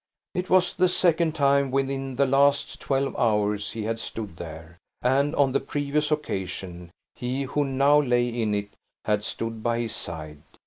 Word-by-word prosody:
It 180 0 -3
was 185 -1 +4
the 185 +1 +3
second 170 -3 +2
time 140 -1 +3
within 135 0 -1
the 140 +2 +3
last 140 +1 +2
twelve 135 0 0
hours 105 -2 +1
he 110 - -4
had 115 +1 -2
stood 105 -8 -6
there; 80 +1 -9 0.2
and, 140 +4 +2
on 140 -2 +3
the 140 - +2
previous 145 +1 -1
occasion, 95 - -3 0.3
he 130 +2 -2
who 145 +2 0
now 140 +2 +4
lay 120 -3 +2
in 115 -3 -1
it, 100 0 -3 0.3
had 105 -1 +1
stood 115 0 -4
by 120 +1 0
his 115 -2 -3
side. 80 -8 -6
130 Hz, 170 wpm, -25 LUFS, 105-140 Hz, 0.3 s, was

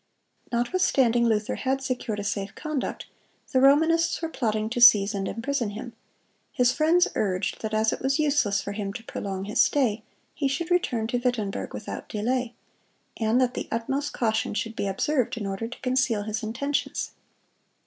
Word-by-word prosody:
Notwithstanding 240 -2 +2
Luther 220 +1 +1
had 270 0 -1
secured 245 -5 -2
a - - -3
safe 200 -1 -3
conduct, 305 -4 -4 0.5
the 260 - +3
Romanists 320 +5 +4
were 330 - -3
plotting 215 -7 -1
to 245 - -2
seize 210 -4 +7
and 195 -1 -2
imprison 240 -1 -2
him. 220 +3 -7 0.6
His 245 -1 +3
friends 335 +5 +3
urged 190 -2 -1
that 220 - -3
as 220 0 +2
it - - -4
was 270 +1 +1
useless 285 -10 +2
for 200 - -4
him 200 -1 -4
to 225 - -7
prolong 195 -4 -5
his 210 - +2
stay, 235 -7 +2 0.3
he 285 - 0
should 330 +6 -2
return 255 -11 +1
to 240 +2 -1
Wittenberg 240 -5 -2
without - - -7
delay, 245 +3 -1 0.6
and 225 +2 +2
that 255 -1 +2
the - - -4
utmost 270 +6 -1
caution 220 -3 0
should 225 +2 -3
be - - -2
observed 245 +6 0
in 210 - -4
order 195 +3 -3
to 245 - -10
conceal 255 -4 +1
his 215 +1 -3
intentions. 260 +6 -2
235 Hz, 170 wpm, -26 LUFS, 215-270 Hz, 0.6 s, seize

